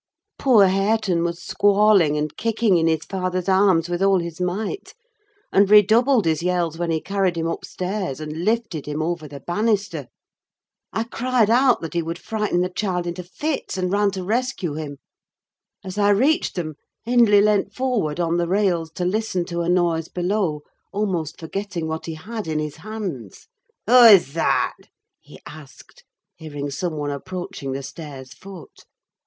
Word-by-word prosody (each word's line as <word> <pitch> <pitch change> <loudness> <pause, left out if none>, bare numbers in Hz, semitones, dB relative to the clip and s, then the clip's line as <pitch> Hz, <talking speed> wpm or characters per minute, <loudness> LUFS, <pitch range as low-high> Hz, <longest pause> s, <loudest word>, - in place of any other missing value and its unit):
Poor 235 -7 +5
Hareton 195 -2 +1
was 170 +1 -3
squalling 200 -6 +3
and 150 0 -3
kicking 225 -4 +1
in 165 0 +2
his 160 -1 0
father's 185 -1 -3
arms 190 -3 +3
with 175 +1 -3
all 195 0 +4
his 170 -1 -5
might, 200 - -3 0.6
and 200 0 +4
redoubled 220 +3 +5
his 160 -1 +1
yells 175 -2 -1
when 175 -1 -1
he 160 -1 +1
carried 195 -1 -1
him 165 - -1
upstairs 180 -1 -4
and 155 +2 -5
lifted 215 -8 -1
him 150 +1 -2
over 165 -2 -3
the 140 -1 -10
banister. 205 +3 -1 0.8
I 225 - -1
cried 235 -1 +1
out 250 +1 +4
that 165 - -6
he 170 - 0
would 165 +1 -5
frighten 210 -2 -1
the 180 - 0
child 180 -3 -2
into 175 +1 -4
fits, 285 - -4
and 180 -1 -1
ran 205 0 +2
to 190 -2 -4
rescue 220 - -1
him. 145 -2 -6 0.9
As 190 +2 -6
I 205 0 +4
reached 270 - +2
them, 155 -4 -4 0.3
Hindley 230 -3 +5
leant 210 -1 +2
forward 235 -12 -1
on 170 0 +1
the 170 -1 0
rails 180 -4 +1
to 180 - -3
listen 185 -2 -1
to 170 -1 -3
a 170 - -1
noise 170 -2 +1
below; 180 -4 -1 0.3
almost 185 -7 -2
forgetting 175 0 -4
what 160 +1 -5
he 165 - -4
had 215 +5 -7
in 155 -1 -1
his 150 -1 -4
hands. 180 - -7 0.4
"Who 230 - +1
is 190 -11 +7
that?" 165 - +1 0.4
he - - -16
asked, 150 -2 -14 0.3
hearing 145 -2 -6
some 160 +3 -3
one 145 -1 -2
approaching 145 -3 -6
the 135 +1 -5
stairs' 135 -3 -9
foot. 190 -4 -13
180 Hz, 165 wpm, -22 LUFS, 160-210 Hz, 0.9 s, is